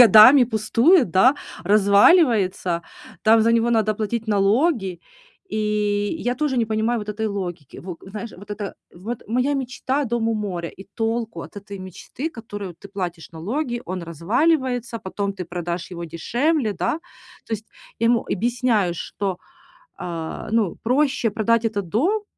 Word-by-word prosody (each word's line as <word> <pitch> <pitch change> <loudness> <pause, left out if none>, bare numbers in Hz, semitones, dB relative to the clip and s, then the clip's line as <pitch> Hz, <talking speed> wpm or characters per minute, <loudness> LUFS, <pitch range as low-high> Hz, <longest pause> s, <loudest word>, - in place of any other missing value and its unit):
годами, 230 +6 +9
пустует, 240 - +3
да, 245 +10 +5 0.3
разваливается, 200 - +4 0.4
там 225 0 +6
за 230 +1 +3
него 230 +1 +3
надо 215 -2 +2
платить 220 +2 -3
налоги, 205 - +2 0.5
и 210 +2 0
я 245 +1 -1
тоже 280 -1 -1
не 235 - +3
понимаю 220 +2 0
вот 210 - -8
этой 220 +1 -2
логики. 180 -8 -5
Во 180 -2 -7
знаешь, 210 +3 -7
вот 200 +2 -13
это: 205 -2 -5 0.2
вот 215 +7 -6
моя 255 +5 +1
мечта- 265 +1 -1
дом 230 -1 0
у 225 - +1
моря, 180 -6 -3
и 195 - -13
толку 225 0 -2
от - - -12
этой 200 0 -8
мечты, 190 - -6
которую 205 - -7
ты 200 +4 -13
платишь 180 -4 -5
налоги, 240 - -3
он 185 -1 -4
разваливается, 240 - 0
потом 200 0 -3
ты 185 -2 -6
продашь 175 +1 -4
его 170 0 -5
дешевле, 235 - 0
да? 300 - -1 0.5
То - - -7
есть 215 +1 -8 0.3
я 230 - +3
ему 235 -1 +3
объясняю, 230 -4 +1
что, 185 +1 -4 0.6
а, 165 +4 -5
ну 220 -6 +1
проще 260 -1 +2
продать 230 +1 +2
этот 205 -5 -2
дом, 375 - +1
215 Hz, 155 wpm, -22 LUFS, 190-240 Hz, 0.6 s, годами